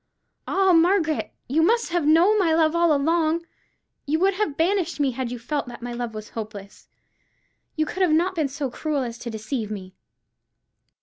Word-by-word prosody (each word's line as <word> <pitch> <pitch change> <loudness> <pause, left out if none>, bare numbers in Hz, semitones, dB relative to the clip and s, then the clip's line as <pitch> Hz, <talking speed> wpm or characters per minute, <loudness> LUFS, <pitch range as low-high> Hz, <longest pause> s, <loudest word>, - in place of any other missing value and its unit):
Ah, 385 -1 +3
Margaret, 330 -2 +2 0.2
you 295 +6 +2
must 460 +6 +2
have 340 -3 0
known 350 +7 +5
my 330 -4 +3
love 320 0 +3
all 340 -1 +3
along! 320 +3 +1 0.6
You 305 +2 +1
would 385 +4 +2
have 370 -7 -2
banished 345 -1 0
me 280 -2 +2
had 255 0 -4
you 245 - -5
felt 275 +4 -3
that 240 -1 -9
my 245 0 -5
love 240 -2 -5
was 215 0 -7
hopeless: 210 -3 -8 0.9
you 310 -2 +1
could 370 +3 0
not 330 +4 +3
have 375 - -14
been 315 -4 +1
so 275 -1 -4
cruel 295 0 -2
as 235 -1 -6
to 240 - -6
deceive 220 0 -4
me." 190 -3 -7
310 Hz, 185 wpm, -24 LUFS, 245-340 Hz, 0.9 s, known